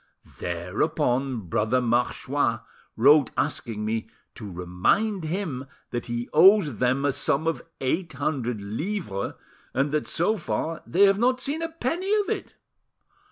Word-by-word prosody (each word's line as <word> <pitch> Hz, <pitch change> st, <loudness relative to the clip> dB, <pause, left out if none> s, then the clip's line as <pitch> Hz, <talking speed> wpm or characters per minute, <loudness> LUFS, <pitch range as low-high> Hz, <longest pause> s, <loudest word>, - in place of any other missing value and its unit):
Thereupon 125 Hz, -, -1 dB
Brother 105 Hz, +7 st, +1 dB
Marchois 120 Hz, 0 st, 0 dB, 0.3 s
wrote 140 Hz, +2 st, +6 dB
asking 105 Hz, -2 st, -2 dB
me 110 Hz, 0 st, -2 dB, 0.2 s
to 105 Hz, -4 st, -8 dB
remind 90 Hz, -, 0 dB
him 155 Hz, -6 st, -3 dB, 0.2 s
that 120 Hz, 0 st, -3 dB
he 120 Hz, 0 st, -3 dB
owes 170 Hz, -, +6 dB
them 130 Hz, +4 st, +1 dB
a 145 Hz, -, +3 dB
sum 140 Hz, +3 st, +1 dB
of 165 Hz, 0 st, 0 dB, 0.2 s
eight 165 Hz, +7 st, -1 dB
hundred 125 Hz, -8 st, -2 dB
livres, 110 Hz, -, -3 dB, 0.4 s
and 140 Hz, +3 st, +1 dB
that, 150 Hz, 0 st, -1 dB
so 195 Hz, +7 st, +1 dB
far, 165 Hz, -2 st, -3 dB
they 185 Hz, +5 st, +4 dB
have 195 Hz, 0 st, +5 dB
not 255 Hz, +2 st, +3 dB
seen 290 Hz, +5 st, -3 dB
a 330 Hz, -, -2 dB
penny 330 Hz, +5 st, -2 dB
of 405 Hz, -, -6 dB
it." -, -, -4 dB
140 Hz, 140 wpm, -25 LUFS, 115-190 Hz, 0.4 s, wrote